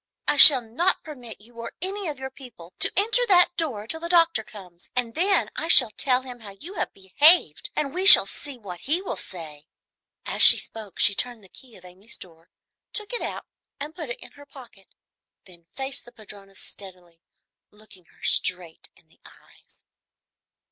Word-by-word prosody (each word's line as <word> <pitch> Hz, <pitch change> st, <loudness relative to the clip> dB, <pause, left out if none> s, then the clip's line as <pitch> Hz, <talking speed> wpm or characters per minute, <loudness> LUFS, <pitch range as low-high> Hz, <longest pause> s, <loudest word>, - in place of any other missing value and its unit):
I -, -, +1 dB
shall 275 Hz, -3 st, +8 dB
not 330 Hz, +12 st, -1 dB
permit 250 Hz, -7 st, -12 dB
you 230 Hz, +2 st, -19 dB
or 230 Hz, 0 st, -9 dB
any 390 Hz, +2 st, -6 dB
of 295 Hz, -3 st, -6 dB
your 265 Hz, 0 st, -9 dB
people 225 Hz, -11 st, -16 dB
to -, -, +1 dB
enter 440 Hz, +5 st, +2 dB
that 355 Hz, -3 st, +3 dB
door 260 Hz, -11 st, -5 dB
till 320 Hz, +8 st, -2 dB
the 335 Hz, +1 st, -7 dB
doctor 335 Hz, -9 st, +2 dB
comes, 180 Hz, -5 st, -15 dB
and 240 Hz, -2 st, -3 dB
then 375 Hz, -, -1 dB
I 325 Hz, -, -5 dB
shall 250 Hz, -8 st, +5 dB
tell 255 Hz, +2 st, -1 dB
him 250 Hz, -2 st, -11 dB
how 200 Hz, -3 st, -14 dB
you 355 Hz, +6 st, -10 dB
have -, -, -5 dB
behaved, 195 Hz, -, +3 dB
and 285 Hz, -2 st, -4 dB
we 370 Hz, +2 st, -1 dB
shall -, -, +10 dB
see 285 Hz, -3 st, -9 dB
what 190 Hz, -6 st, -11 dB
he 310 Hz, -, -1 dB
will 380 Hz, -, -7 dB
say." 155 Hz, -4 st, -11 dB, 0.6 s
As -, -, -3 dB
she -, -, +9 dB
spoke 215 Hz, -4 st, -8 dB
she 200 Hz, -, +3 dB
turned 240 Hz, +1 st, -3 dB
the 190 Hz, -, -20 dB
key 250 Hz, +1 st, -17 dB
of 185 Hz, -, -19 dB
Amy's 190 Hz, +6 st, -13 dB
door, 165 Hz, -1 st, -16 dB, 0.4 s
took 425 Hz, +2 st, -2 dB
it 480 Hz, -, -4 dB
out -, -, -7 dB, 0.3 s
and 295 Hz, +2 st, -8 dB
put 315 Hz, -7 st, -9 dB
it 240 Hz, -, -7 dB
in -, -, -14 dB
her 285 Hz, 0 st, -18 dB
pocket, 240 Hz, -9 st, -17 dB, 0.6 s
then 170 Hz, -3 st, -19 dB
faced 270 Hz, 0 st, -7 dB
the 240 Hz, -, -16 dB
padrona 200 Hz, -3 st, -16 dB
steadily, 180 Hz, -4 st, -13 dB, 0.5 s
looking 210 Hz, -4 st, -19 dB
her -, -, -27 dB
straight 175 Hz, -3 st, -3 dB
in -, -, -28 dB
the -, -, -32 dB
eyes. -, -, -23 dB
240 Hz, 190 wpm, -22 LUFS, 195-310 Hz, 0.6 s, shall